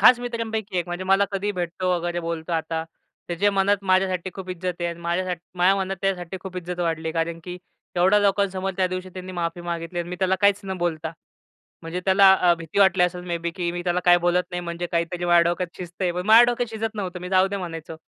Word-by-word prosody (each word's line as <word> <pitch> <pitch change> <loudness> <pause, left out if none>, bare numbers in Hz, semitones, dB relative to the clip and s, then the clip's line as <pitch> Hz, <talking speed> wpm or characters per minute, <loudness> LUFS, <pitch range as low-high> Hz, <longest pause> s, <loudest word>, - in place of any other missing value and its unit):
खास 245 - +8
मित्रांपैकी 220 -5 -3
एक 175 - -1
म्हणजे 175 +1 -4
मला 195 +1 +4
कधीही 200 +1 -1
भेटतो 180 0 -2
वगैरे 175 0 -2
बोलतो 165 0 -4
आता. 160 0 -1 0.4
त्याच्या 185 +4 +2
मनात 200 +1 +3
माझ्यासाठी 185 -1 +1
खूप 190 -1 -8
इज्जत 180 0 -3
आहे 175 - 0
आणि 170 0 -6
माझ्यासाठ 175 +1 -1 0.2
माझ्या 185 +2 +4
मनात 195 0 -2
त्याच्यासाठी 190 -2 -2
खूप 190 -1 -8
इज्जत 180 0 -5
वाढली, 160 -1 -1
कारण 165 0 -1
की 180 0 -6 0.4
एवढ्या 190 +4 +5
लोकांसमोर 195 -1 +1
त्यादिवशी 185 0 -1
त्यांनी 185 0 -7
माफी 170 -1 -3
मागितली 170 0 -4
आणि 175 - -3
मी 180 - -5
त्याला 190 0 +2
काहीच 200 0 +4
न 190 -1 -4
बोलता. 165 -2 -2 0.7
म्हणजे 165 +2 -4
त्याला 195 0 +6
अ, 180 -2 +4
भीती 165 +3 -4
वाटली 190 -2 +5
असेल 180 0 0
मे 170 -1 -2
बे 170 +1 -3
की 175 -2 -1
मी 175 0 -4
त्याला 175 0 +1
काही 175 0 +7
बोलत 175 +1 +2
नाही 175 0 -3
म्हणजे 170 0 -4
काहीतरी 170 +1 -1
माझ्या 175 -1 +5
डोक्यात 180 0 -2
शिजतंय. 180 0 -3
पण 180 +2 -4
माझ्या 225 +2 +9
डोक्यात 240 -1 -1
शिजत 225 0 -3
नव्हतं. 185 -4 -4
मी 180 - -6
जाऊ 185 +1 +4
दे 200 - -3
म्हणायचो. 165 -3 -6
180 Hz, 220 wpm, -24 LUFS, 170-190 Hz, 0.7 s, माझ्या